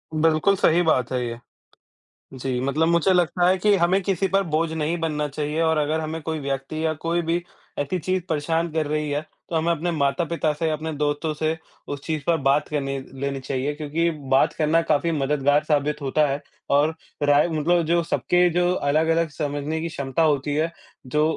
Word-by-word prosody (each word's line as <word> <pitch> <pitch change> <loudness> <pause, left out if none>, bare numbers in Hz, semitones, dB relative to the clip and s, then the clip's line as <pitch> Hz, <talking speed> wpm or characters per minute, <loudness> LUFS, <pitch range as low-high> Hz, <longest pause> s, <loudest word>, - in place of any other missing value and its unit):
बिल्कुल 160 +5 +3
सही 175 -1 +3
बात 130 -8 +1
है 125 - 0
ये। 115 0 -5 0.9
जी, 130 -1 -3
मतलब 145 +5 +1
मुझे 170 +2 +3
लगता 175 0 +2
है 190 - +4
कि 205 +2 +3
हमें 185 +2 +3
किसी 195 0 0
पर 195 0 +2
बोझ 165 0 +1
नहीं 160 +2 -1
बनना 150 -2 -1
चाहिए 150 +3 -3
और 160 -1 +2
अगर 155 +2 0
हमें 160 +1 -4
कोई 160 0 -3
व्यक्ति 140 +3 -3
या 160 - +2
कोई 170 +1 +1
भी 165 +1 0 0.4
ऐसी 145 +6 -1
चीज़ 185 +2 -1
परेशान 160 +2 0
कर 160 -2 0
रही 150 0 -1
है, 145 +1 0 0.3
तो 165 - -2
हमें 165 +2 +1
अपने 170 +2 -1
माता-पिता 155 +1 0
से, 160 +2 -1
अपने 155 +1 -3
दोस्तों 150 +1 -1
से 155 +1 -1 0.3
उस 145 -1 -4
चीज़ 155 -3 -2
पर 170 -1 +3
बात 140 +1 +1
करनी 135 -2 -2 0.2
लेनी 140 -1 -2
चाहिए, 135 +2 -2
क्योंकि 155 +3 -1 0.2
बात 135 +1 +4
करना 160 +2 +2
काफ़ी 165 +1 +1
मददगार 145 0 +2
साबित 150 -1 0
होता 150 +3 +2
है 140 +1 -2 0.3
और 150 +3 +3 0.3
राय 145 +3 +4
मतलब 165 +2 +2
जो 170 +1 +2
सबके 180 +1 +2
जो 180 0 +3
अलग-अलग 160 +2 +1
समझने 145 +1 -3
की 170 - -3
क्षमता 140 -1 -2
होती 145 -2 +1
है, 160 +2 0 0.3
जो 150 +4 +1
155 Hz, 190 wpm, -23 LUFS, 145-165 Hz, 0.9 s, है